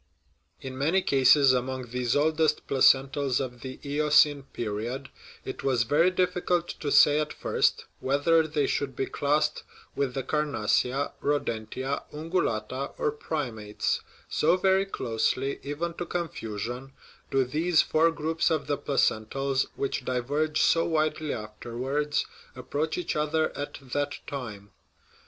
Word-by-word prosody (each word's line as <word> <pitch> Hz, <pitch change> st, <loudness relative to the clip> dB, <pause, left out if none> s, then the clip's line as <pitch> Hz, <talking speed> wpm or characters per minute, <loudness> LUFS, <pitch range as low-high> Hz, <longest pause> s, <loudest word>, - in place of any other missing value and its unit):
In 130 Hz, 0 st, -7 dB
many 170 Hz, +7 st, +2 dB
cases 135 Hz, 0 st, +5 dB
among 130 Hz, -1 st, -2 dB
these 125 Hz, -1 st, 0 dB
oldest 155 Hz, +1 st, +2 dB
placentals 135 Hz, 0 st, +3 dB
of 125 Hz, -3 st, -5 dB
the 130 Hz, -1 st, -7 dB
Eocene 150 Hz, 0 st, +4 dB
period 120 Hz, +5 st, -4 dB, 0.4 s
it -, -, -6 dB
was 130 Hz, -4 st, +2 dB
very 150 Hz, +9 st, +3 dB
difficult 180 Hz, -1 st, 0 dB
to 145 Hz, -, -4 dB
say 150 Hz, 0 st, +6 dB
at 155 Hz, 0 st, -2 dB
first -, -, 0 dB
whether 155 Hz, +4 st, +2 dB
they 150 Hz, -2 st, 0 dB
should 135 Hz, -2 st, -2 dB
be 135 Hz, -, -1 dB
classed 150 Hz, +2 st, 0 dB, 0.3 s
with 140 Hz, -3 st, -1 dB
the 135 Hz, -, -2 dB
carnassia, 140 Hz, -2 st, 0 dB
rodentia, 130 Hz, -1 st, -2 dB
ungulata, 140 Hz, -6 st, -2 dB
or 150 Hz, -, 0 dB
primates; 120 Hz, -9 st, -3 dB, 0.3 s
so 165 Hz, +4 st, +2 dB
very 190 Hz, +1 st, +3 dB
closely, 130 Hz, -2 st, -1 dB
even 155 Hz, +4 st, -3 dB
to 175 Hz, +1 st, -5 dB
confusion, 125 Hz, -, -4 dB, 0.4 s
do 135 Hz, -1 st, +2 dB
these 160 Hz, +6 st, +2 dB
four 165 Hz, +2 st, +3 dB
groups 165 Hz, +1 st, 0 dB
of 155 Hz, -3 st, 0 dB
the 145 Hz, -1 st, -1 dB
placentals, 135 Hz, 0 st, 0 dB
which 135 Hz, -1 st, -2 dB
diverge 145 Hz, +5 st, -1 dB
so 165 Hz, -, +4 dB
widely 155 Hz, -1 st, 0 dB
afterwards, 125 Hz, +7 st, -2 dB, 0.3 s
ap 130 Hz, -, -11 dB
proach 155 Hz, +2 st, -1 dB
each 180 Hz, -, -2 dB
other 155 Hz, +1 st, 0 dB
at 145 Hz, -, -5 dB
that 145 Hz, +1 st, -1 dB
time. 110 Hz, -8 st, -7 dB
140 Hz, 135 wpm, -27 LUFS, 130-155 Hz, 0.4 s, say